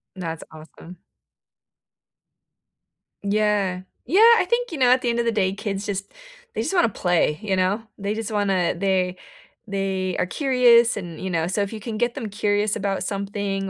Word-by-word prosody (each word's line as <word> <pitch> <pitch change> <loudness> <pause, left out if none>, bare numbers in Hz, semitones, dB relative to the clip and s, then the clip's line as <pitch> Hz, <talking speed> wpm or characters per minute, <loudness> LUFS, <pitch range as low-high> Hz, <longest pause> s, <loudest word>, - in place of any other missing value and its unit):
That's 165 -4 -5
awesome. 160 +3 -13 2.3
Yeah. 200 -3 +1 0.2
Yeah, 365 - +3 0.2
I - - +2
think, 485 -1 0
you 325 - -4
know, 255 -2 +4
at 255 +1 +4
the 245 - 0
end 235 0 0
of 235 - 0
the 230 - +2
day, 195 -3 +1
kids 200 0 -4
just 200 -1 -4 0.4
they - - -1
just - - -2
wanna 350 -10 +3
play, 175 -6 +1
you 200 -3 -1
know? 190 +4 0
They 200 +1 -2
just 220 0 -4
wanna 195 -4 +1
they 185 -1 0 0.5
they 195 -2 -2
are - - +1
curious 240 0 +4
and, 175 -5 -7
you 190 - -3
know 165 -2 0
so 190 +4 -1
if 200 - -2
you 220 - -6
can 220 0 -5
get 240 +1 0
them 235 -7 -5
curious 205 +1 0
about 195 -1 -2
something 200 0 -3
200 Hz, 180 wpm, -23 LUFS, 185-225 Hz, 2.3 s, know